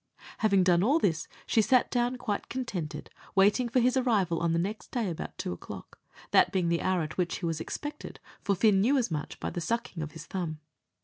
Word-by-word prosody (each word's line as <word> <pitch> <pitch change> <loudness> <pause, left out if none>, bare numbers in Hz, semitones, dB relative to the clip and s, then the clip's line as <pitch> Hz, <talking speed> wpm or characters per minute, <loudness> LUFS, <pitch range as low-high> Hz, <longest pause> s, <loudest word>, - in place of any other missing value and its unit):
Having 200 -4 +4
done 175 -1 +4
all 265 - +4
this, 165 - 0 0.2
she 225 - +3
sat 250 +3 +3
down 245 0 +1
quite 210 -5 -3
contented, 180 -12 -4 0.2
waiting 205 +5 +4
for 250 - +3
his 250 +1 +3
arrival 210 -10 +2
on 170 -1 +1
the 165 - +2
next 200 +6 -3
day 225 -7 -1
about 165 - -6
two - - -3
o'clock, 85 - -10 0.3
that - - +5
being 180 -3 +1
the 170 0 +1
hour 185 -2 +1
at 155 +4 -6
which 175 -1 0
he 175 - -4
was 165 -1 -1
expected 295 - -6 0.2
for 200 - +1
Fin 200 0 +4
knew 265 +7 +4
as 240 -8 0
much 150 -2 -4
by - - -3
the 175 - -4
sucking 185 -1 -2
of 150 -1 -5
his 160 -1 -9
thumb. 165 -3 -4
190 Hz, 215 wpm, -29 LUFS, 170-235 Hz, 0.3 s, that